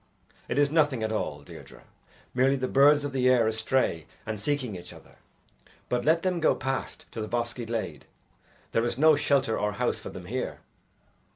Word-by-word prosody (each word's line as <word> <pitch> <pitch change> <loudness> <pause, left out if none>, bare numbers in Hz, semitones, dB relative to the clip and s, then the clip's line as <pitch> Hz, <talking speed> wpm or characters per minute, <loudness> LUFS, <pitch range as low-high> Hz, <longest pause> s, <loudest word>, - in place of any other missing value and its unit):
"It - - -1
is 145 -1 +3
nothing 145 -7 +2
at 110 - -1
all, 75 -9 -3
Deirdre - - -13 0.5
merely 130 +2 +3
the 130 -1 -2
birds 145 +2 +5
of 145 - -3
the 130 -1 +3
air 125 -3 +4
astray 110 -6 0 0.2
and 110 -2 -4
seeking 125 -2 -2
each 90 0 -9
other. - - -17 0.7
But 125 0 0
let 165 +2 +3
them 185 -2 0
go 160 - +3
past 135 0 -4
to 115 - -5
the 110 - -3
bosky 120 0 -2
glade. 110 -10 -4 0.7
There 115 - +1
is 120 0 -1
no 155 +2 +6
shelter 140 -5 +1
or 105 0 0
house - - -1
for - - -8
them 90 - -9
here." 125 +7 -4
125 Hz, 185 wpm, -27 LUFS, 110-140 Hz, 0.7 s, no